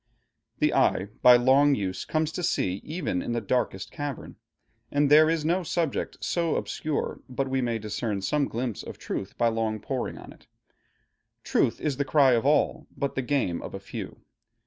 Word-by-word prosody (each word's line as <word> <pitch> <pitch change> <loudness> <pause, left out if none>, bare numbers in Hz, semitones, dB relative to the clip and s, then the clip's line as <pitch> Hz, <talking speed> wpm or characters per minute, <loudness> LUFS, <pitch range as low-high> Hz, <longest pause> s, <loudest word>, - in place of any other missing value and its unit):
The - - +2
eye 95 +2 +2
by 125 0 +9
long 135 +3 +4
use 95 -4 -3
comes 155 0 0
to 180 - -4
see, 95 - 0
even 155 - -2
in 120 - -3
the 120 - 0
darkest 105 -4 -1
cavern; 145 -3 -6 0.5
and 145 0 +2
there 155 +1 +7
is 165 -2 0
no 175 +4 +2
subject 165 -3 -2
so 170 -2 0
obscure, 155 -2 -3
but 135 +2 -2
we 130 0 0
may 120 -2 0
discern 105 -1 -3
some 145 +6 +1
glimpse 120 -2 -3
of - - -9
truth 95 - -5
by 120 -1 +3
long 110 -1 -1
poring 130 +4 -4
on - - -11
it. - - -24 1.0
Truth - - +1
is 145 -4 -2
the 140 - +1
cry 140 -2 +4
of 120 +2 +2
all, 150 0 +2
but 140 - -1
the 130 - -1
game 125 -10 0
of - - -7
a - - -5
few. - - -8
130 Hz, 185 wpm, -27 LUFS, 115-150 Hz, 1.0 s, by